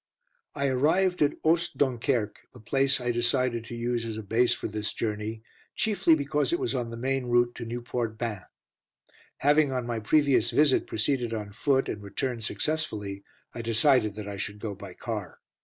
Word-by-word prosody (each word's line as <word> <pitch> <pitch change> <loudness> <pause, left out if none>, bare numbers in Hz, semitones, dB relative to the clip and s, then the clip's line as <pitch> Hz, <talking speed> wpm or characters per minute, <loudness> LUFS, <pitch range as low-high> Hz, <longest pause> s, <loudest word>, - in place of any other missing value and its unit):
I 140 - 0
arrived 165 +8 +2
at 145 0 +2
Oost 170 +2 +2
Dunkerque, 125 -4 0
which 110 - -15
place 135 +2 +2
I 120 -1 0
decided 120 0 +1
to 120 - -7
use 120 0 -1
as 115 -1 -4
a 110 - -5
base 115 +5 +2
for 120 - -1
this 105 -1 -3
journey, 110 0 -3 0.3
chiefly 195 -6 +3
because 145 - 0
it 345 - +2
was 380 - -1
on 120 -1 -2
the 115 - -6
main 130 +1 -1
route 120 0 +3
to 120 - -5
Nieuport 120 -1 -3
Bain. 110 -4 -3 1.0
Having 145 0 +4
on 125 -2 -2
my 120 -1 -2
previous 140 +5 +3
visit 145 -3 +3
proceeded 120 0 0
on 105 -2 -5
foot, 135 +5 +1
and 105 - -4
returned 115 +4 -3
successfully, 105 -8 -2 0.3
I 115 - -5
decided 115 -1 +3
that 105 -1 -6
I 100 -1 -5
should 105 +1 -4
go 105 -1 -4
by 100 -2 -10
car. - - -5
120 Hz, 180 wpm, -28 LUFS, 110-140 Hz, 1.0 s, Having